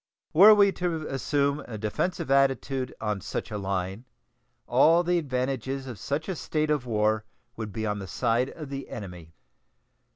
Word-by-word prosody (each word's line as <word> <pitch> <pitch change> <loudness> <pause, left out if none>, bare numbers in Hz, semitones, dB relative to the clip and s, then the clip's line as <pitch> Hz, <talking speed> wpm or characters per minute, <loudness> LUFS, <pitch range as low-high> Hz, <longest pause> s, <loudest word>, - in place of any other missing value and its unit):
Were 205 +6 +9
we 200 -1 +5
to 170 -4 -2
assume 140 +1 0
a 110 - -6
defensive 120 - -2
attitude 135 -1 +2
on 105 -3 -2
such - - -5
a 105 - -2
line, 95 +3 -3 0.6
all 160 +8 +5
the 175 0 +2
advantages 135 -1 -2
of 120 -6 -8
such 145 - -3
a 190 - -2
state 155 -1 -1
of 145 -4 0
war 110 -1 +1 0.3
would 110 -2 -5
be 110 +2 -3
on 105 -1 -1
the 95 - -7
side 120 +5 0
of 155 -4 -9
the 135 -1 -6
enemy. 90 -6 -9
130 Hz, 165 wpm, -27 LUFS, 105-150 Hz, 0.6 s, Were